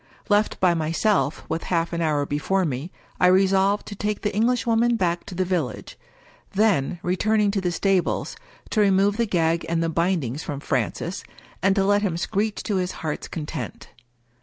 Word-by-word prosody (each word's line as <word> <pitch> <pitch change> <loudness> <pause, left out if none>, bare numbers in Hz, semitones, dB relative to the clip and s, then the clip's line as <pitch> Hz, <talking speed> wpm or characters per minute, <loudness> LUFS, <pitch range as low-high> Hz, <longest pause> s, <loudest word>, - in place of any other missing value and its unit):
Left 210 +1 +2
by 180 -2 +4
myself, 165 -1 0
with 160 +1 -3
half 170 -1 0
an 170 - -1
hour 150 -3 +1
before 180 +7 0
me, 145 +4 -4 0.3
I 180 - +5
resolved 195 +2 +3
to 205 - -7
take 210 +1 -2
the 210 - -1
Englishwoman 235 +1 +2
back 175 -5 -1
to 180 - -7
the 185 +1 0
village 175 -8 -3 0.3
— - - -29
^then, 190 -7 +2
return 215 +5 +1
ing 205 -1 +3
to 200 -1 -1
the 180 -1 0
stables, 190 +1 0 0.4
to 215 - +2
remove 200 +1 +3
the 235 -1 +1
gag 165 -3 +1
and 165 0 +1
the 165 - 0
bindings 165 -5 0
from 145 -3 -5
Francis, 140 - -2 0.4
and 195 +1 +3
to 195 - +2
let 205 +1 +3
him 185 -5 -1
screech 205 +4 -1
to 205 -3 -1
his 180 0 -1
heart's 155 -2 -4
content. 155 -1 -6
185 Hz, 185 wpm, -24 LUFS, 165-205 Hz, 0.4 s, I